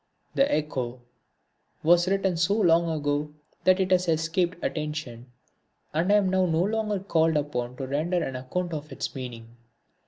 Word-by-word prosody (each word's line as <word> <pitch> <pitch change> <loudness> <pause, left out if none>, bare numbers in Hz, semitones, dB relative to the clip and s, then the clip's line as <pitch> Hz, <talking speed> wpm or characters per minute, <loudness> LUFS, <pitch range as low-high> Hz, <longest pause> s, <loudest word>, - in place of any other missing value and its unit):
The 275 +1 +3
Echo 130 -5 -2 0.8
was 175 +2 +5
written 195 -1 +1
so 175 +4 +2
long 170 -5 +4
ago 145 -1 -1 0.3
that 185 +1 +5
it 190 0 0
has 180 -1 +3
escaped 165 +2 +1
attention 150 -6 -4 0.6
and 165 +6 +1
I - - +6
am 205 -2 +3
now 190 -1 +3
no 165 +1 +2
longer 215 0 0
called 160 -4 +2
upon 125 -4 -2
to 135 - -5
render 160 +6 0
an 130 - -4
account 170 +8 -3
of 150 -1 -6
its - - -4
meaning. 120 -3 -8
160 Hz, 160 wpm, -26 LUFS, 145-180 Hz, 0.8 s, I